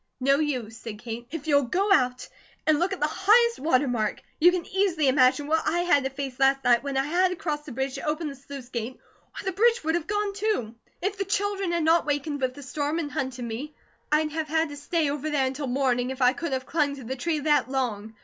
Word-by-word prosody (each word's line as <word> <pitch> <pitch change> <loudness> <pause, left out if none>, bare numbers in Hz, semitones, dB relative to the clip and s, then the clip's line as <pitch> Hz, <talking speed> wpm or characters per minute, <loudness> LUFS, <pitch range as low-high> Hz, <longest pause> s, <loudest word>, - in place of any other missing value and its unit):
"No 275 +2 +3
use!" 250 -8 -2
said 225 -2 -7
Kate. 235 +1 -7
"If 310 0 -6
you 285 -2 +4
go 375 - +2
out 250 -6 +1 0.4
and 310 -1 +3
look 360 +3 +1
at 385 - -3
the 300 - +2
highest 465 +8 +3
water 280 -2 +2
mark, 220 -4 -1 0.2
you 350 +3 +7
can 355 -2 -2
easily 365 -6 +1
imagine 260 +2 +4
what 320 +2 +2
I 345 +1 +1
had 345 -6 +3
to - - 0
face 270 -2 -6
last 270 0 +3
night 240 -1 +4
when 275 -1 -3
I 270 - +2
had 355 +5 +3
to 365 - -3
cross 300 -3 -3
the 295 - -8
bridge 265 +2 -2
to - - -5
open 305 +1 -1
the 285 - -5
sluice 275 -2 -10
gate, 235 0 -4 0.4
or - - -8
the 380 - 0
bridge 460 +4 +3
would 320 +1 0
have 345 -1 -1
gone, 415 -1 -1
too. 395 - -1 0.3
If 395 +1 -2
the - - +1
children 395 -2 -1
had 340 -1 0
not 325 0 +3
wakened 290 0 -1
with 255 -1 -1
the 285 - -10
storm, 290 +3 -2
and 300 -4 -3
hunted 255 -2 -3
me, 250 +7 -6 0.4
I'd 305 0 +2
have 315 0 -3
had 320 +1 +1
to 290 - -7
stay 310 +2 -1
over 295 +1 -3
there 285 -3 +1
until 270 +2 -3
morning, 250 -1 +1
if 265 0 -5
I 250 +1 +5
could 335 0 -4
have 260 0 -2
clung 290 -3 0
to 270 - -10
the 255 +3 -4
tree 315 +5 -1
that 295 -4 +2
long. 225 -5 -2
290 Hz, 250 wpm, -26 LUFS, 260-335 Hz, 0.4 s, you